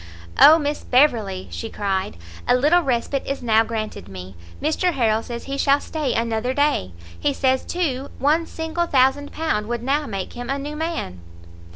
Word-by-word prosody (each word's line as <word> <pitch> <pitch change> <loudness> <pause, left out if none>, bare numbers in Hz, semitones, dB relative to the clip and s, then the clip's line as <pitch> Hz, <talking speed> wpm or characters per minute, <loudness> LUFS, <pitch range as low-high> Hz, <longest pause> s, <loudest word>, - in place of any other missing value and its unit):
"Oh 315 - +9
Miss 295 -1 -2
Beverley," 225 -8 +2
she 225 - -5
cried, 195 - -2 0.3
"a 245 - +5
little 300 +8 +4
respite 265 -1 -1
is 275 -2 -3
now 225 -1 +4
granted 220 - -5
me! 95 0 -9 0.2
Mr 335 +4 0
Harrel 225 -5 +1
says 235 0 -7
he 275 0 -5
shall 280 +1 +4
stay 300 -2 -3
another 230 +2 -1
day; 285 - +1 0.3
he 285 - +1
says, 260 -1 +1
too, 285 -7 -2
one 315 +4 +2
single 325 +1 -3
thousand 270 +1 +2
pound 260 -10 -1
would 240 0 -3
now 285 +3 0
make 195 -3 -5
him 245 +1 -7
a 275 - 0
new 290 +2 -5
man." 315 - -4
265 Hz, 175 wpm, -22 LUFS, 225-295 Hz, 0.3 s, Oh